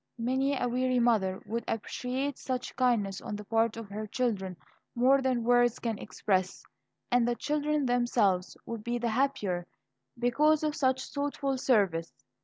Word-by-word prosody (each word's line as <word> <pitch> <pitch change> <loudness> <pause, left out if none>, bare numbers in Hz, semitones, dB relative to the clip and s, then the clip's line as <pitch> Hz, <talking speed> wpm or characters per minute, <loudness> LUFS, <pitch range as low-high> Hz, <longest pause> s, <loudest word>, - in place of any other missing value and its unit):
Many 260 +3 0
a 245 - 0
weary 255 +1 +1
mother 215 -6 +2
would 230 +2 -3
appreciate 255 +5 -3
such 255 -1 -4
kindness 225 -7 +1
on 210 - -5
the 210 - -7
part 225 +1 +1
of 225 -3 -7
her 215 +1 -4
children 200 -7 -2 0.4
more 260 +3 +4
than 255 -3 0
words 245 0 +4
can 225 -3 -3
express, 190 -2 -1 0.5
and 245 -1 +4
the 240 - +1
children 300 +1 0
themselves 240 -7 +1
would 230 -2 -6
be 240 +1 -1
the 240 0 -1
happier 215 -8 0 0.5
because 295 +6 +3
of 305 -1 0
such 260 -2 +1
thoughtful 285 -1 -1
service. 195 -11 +1
240 Hz, 155 wpm, -30 LUFS, 215-260 Hz, 0.5 s, more